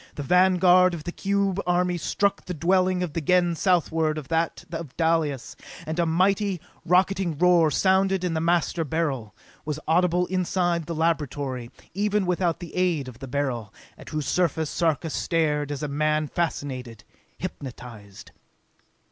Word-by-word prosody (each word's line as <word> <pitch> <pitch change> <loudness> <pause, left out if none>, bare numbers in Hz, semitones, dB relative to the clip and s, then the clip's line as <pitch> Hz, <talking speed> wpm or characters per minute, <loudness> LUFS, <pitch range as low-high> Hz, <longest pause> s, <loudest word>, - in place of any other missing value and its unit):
The 145 - -4
vanguard 180 +1 +5
of 155 - -8
the 175 - -4
cube 200 0 0
army 180 0 +2
struck 200 +4 -1
the 180 - -5
dwelling 185 +2 +2
of 165 -5 -4
the 165 - -2
Gens 175 +1 +2
southward 160 -4 +1
of 150 -4 -7
that 165 0 -1
of 165 -5 -7
Dalis, 160 -5 0 0.3
and 160 +2 -3
a 170 - +2
mighty, 190 +3 +1 0.2
rocketing 180 -2 +2
roar 175 -1 +4
sounded 190 +3 +2
in 180 -2 -1
the 160 - -1
Master 170 0 +1
Beryl, 145 -8 -2 0.3
was 150 0 -4
audible 180 +2 +3
inside 175 -3 0
the 170 - -3
laboratory, 145 -6 -1 0.2
even 205 +1 0
without 180 -1 0
the 175 - -8
aid 175 -7 +1
of 125 -2 -10
the 135 - -7
Beryl, 125 -6 -2 0.2
at - - -12
whose 155 -2 -3
surface 160 -1 0
Sarka 160 -1 0
stared 150 -4 0
as 145 0 -4
a - - -1
man 155 +1 0
fascinated, 130 - -4 0.3
hypnotized. 120 - -9
165 Hz, 155 wpm, -25 LUFS, 150-180 Hz, 0.3 s, vanguard